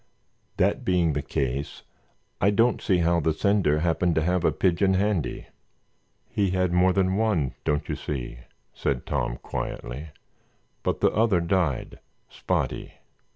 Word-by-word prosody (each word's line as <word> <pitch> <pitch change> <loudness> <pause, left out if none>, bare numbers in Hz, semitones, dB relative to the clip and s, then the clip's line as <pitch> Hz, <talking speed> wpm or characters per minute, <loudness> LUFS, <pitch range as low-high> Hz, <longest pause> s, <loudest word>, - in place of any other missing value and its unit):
That - - +1
being 90 -4 +2
the 75 - -1
case, 70 +1 -3 0.6
I 100 - +5
don't 115 +3 +2
see 95 -4 +2
how 85 0 +3
the 80 0 +1
sender 85 -4 +2
happened 85 0 +1
to 80 - +2
have 90 +1 +1
a - - +3
pigeon 95 +1 +2
handy." 95 -8 -1 0.8
"He 100 -2 0
had 90 -1 0
more 90 +1 +4
than 95 0 +1
one, 105 - +1
don't 75 0 0
you - - -2
see?" 65 -4 -5 0.3
said 65 -3 -2
Tom, - - -2
quietly, 70 +7 -5 0.7
"but - - -2
the - - +4
other 110 -4 +3
died—Spotty. 85 -5 -2
85 Hz, 140 wpm, -26 LUFS, 75-95 Hz, 0.8 s, I